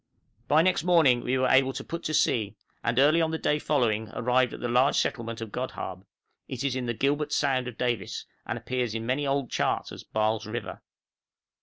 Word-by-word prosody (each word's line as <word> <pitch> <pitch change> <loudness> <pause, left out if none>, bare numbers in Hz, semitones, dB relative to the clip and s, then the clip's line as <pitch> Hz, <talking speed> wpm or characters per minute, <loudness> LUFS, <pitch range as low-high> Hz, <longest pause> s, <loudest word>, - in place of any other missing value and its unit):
By 155 +2 +5
next 185 -3 +2
morning 160 -9 +4
we 130 +2 0
were 130 0 +2
able 135 0 +4
to - - -5
put 170 - -5
to 155 - -1
sea, 110 -6 +1 0.3
and 120 0 0
early 150 +5 +5
on 160 - +1
the 160 - -2
day 150 -1 0
following 110 -8 0
arrived 125 +1 +2
off - - -8
the 120 - -2
large 125 +3 +3
settlement 115 -3 -2
of 115 -2 -6
Godhaab; 100 -6 -5 0.4
it 130 0 -5
is 135 -2 0
in 125 -2 -3
the 120 - -1
"Gilbert 145 +5 0
Sound" 135 -4 +1
of 120 -2 -7
Davis, 120 -7 -2 0.2
and - - -2
appears 125 -3 -2
in 115 0 -3
many 135 +4 0
old 135 -2 -1
charts - - -1
as - - -9
Baal's 110 0 -1
River. 110 -1 -5
125 Hz, 205 wpm, -27 LUFS, 115-140 Hz, 0.4 s, By